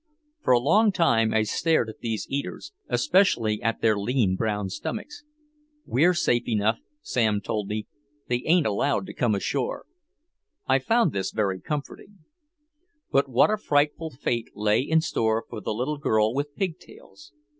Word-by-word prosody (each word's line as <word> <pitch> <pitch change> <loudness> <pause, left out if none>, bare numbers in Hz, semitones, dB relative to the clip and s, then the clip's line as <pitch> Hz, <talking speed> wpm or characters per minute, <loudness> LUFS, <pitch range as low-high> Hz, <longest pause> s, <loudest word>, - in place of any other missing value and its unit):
For - - +1
a 125 - +6
long 205 - +4
time 115 - +2
I 110 - +2
stared 155 +4 +1
at 110 - -10
these 110 -4 -3
eaters, 140 +1 -5 0.2
especially 120 - +2
at 115 +1 -1
their 110 -2 +3
lean 100 -2 +1
brown 105 -1 -2
stomachs. 295 - -6 0.6
"We're 170 +8 +3
safe 120 -8 +1
enough," 110 0 +1 0.2
Sam 110 -4 +1
told 105 0 -3
me. 105 +1 -3 0.4
"They 120 0 0
ain't 170 -1 +4
allowed 105 0 0
to - - -9
come 115 -4 +1
ashore." 455 - -2 0.8
I - - +3
found 230 -7 +2
this 95 -4 -2
very 95 -3 -1
comforting. 150 +7 -6 0.9
But 140 0 +2
what 130 - +4
a 215 - +1
frightful 150 -3 0
fate 120 -4 -3
lay 105 +2 +2
in 160 +4 +2
store 110 -6 0
for 110 -3 -7
the - - -5
little 130 +7 -2
girl 110 -4 +2
with 145 +2 -3
pig 185 -3 -2
tails. 100 +1 -16
120 Hz, 160 wpm, -25 LUFS, 110-150 Hz, 0.9 s, a